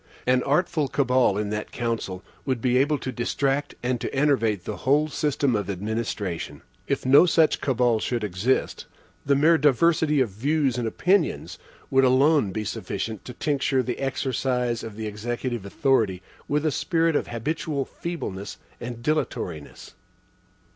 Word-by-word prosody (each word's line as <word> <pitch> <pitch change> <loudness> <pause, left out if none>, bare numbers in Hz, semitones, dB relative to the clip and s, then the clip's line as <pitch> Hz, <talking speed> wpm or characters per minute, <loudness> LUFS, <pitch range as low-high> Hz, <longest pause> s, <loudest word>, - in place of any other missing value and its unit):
An 125 0 +3
artful 150 +1 +1
cabal 125 -5 +2
in 105 0 -2
that 105 0 -4
council 115 -6 -3 0.2
would 130 -3 -1
be 125 +1 +1
able 145 +3 +2
to 130 - -5
distract 135 +4 -1
and 125 -1 -1
to - - -3
enervate 120 -9 +1
the 105 - -4
whole 150 +4 +2
system 140 -4 0
of 105 -1 -2
administration. 100 -3 -4 0.2
If - - -1
no 140 +7 +7
such 160 -2 +3
cabal 125 -4 +2
should 120 0 -2
exist, 105 +6 -1 0.4
the 140 - +4
mere 160 +4 +4
diversity 150 +1 +3
of 130 -4 +2
views 135 +3 0
and 120 - -1
opinions 180 - 0 0.3
would 135 0 +4
alone 130 -3 +4
be 110 +3 -3
sufficient 105 +1 -4
to 125 - -7
tincture 140 -3 0
the 125 -1 -4
exercise 130 -3 -1
of 110 -2 -7
the 110 0 -5
executive 115 +1 -4
authority 105 -6 +1 0.2
with 150 +2 0
a 155 - +2
spirit 165 +1 +1
of - - 0
habitual 140 +4 -2
feebleness 125 - -6 0.2
and 120 -1 -7
dilatoriness. 90 - -3
130 Hz, 150 wpm, -25 LUFS, 110-145 Hz, 0.4 s, no